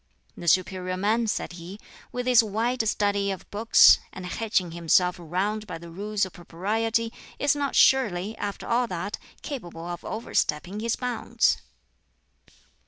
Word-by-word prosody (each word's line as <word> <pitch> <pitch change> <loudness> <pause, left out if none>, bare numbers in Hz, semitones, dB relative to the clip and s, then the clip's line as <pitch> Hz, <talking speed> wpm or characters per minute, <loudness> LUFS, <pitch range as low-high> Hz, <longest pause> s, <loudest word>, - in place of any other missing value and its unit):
"The 170 - -8
superior 185 +1 +1
man," 220 +4 +1
said 205 - -2
he, 175 +3 -9 0.3
"with 245 0 -3
his 250 -2 +6
wide 225 +3 -1
study 200 -1 +1
of 190 -2 -5
books, 220 +3 +6
and 185 - -8
hedging 185 -2 -1
himself 170 +2 +2
round 195 +6 -2
by 170 - -5
the 170 0 -11
Rules 205 +3 -1
of 185 - -11
Propriety, 225 +7 -1 0.2
is 285 0 +2
not 285 -1 -2
surely, 215 -6 +3
after 200 -1 -4
all 240 +1 +1
that, 185 +1 -4 0.2
capable 175 - -6
of 175 0 -6
overstepping 195 -3 -2
his 230 +1 0
bounds." 245 -3 0
205 Hz, 145 wpm, -26 LUFS, 180-225 Hz, 0.3 s, his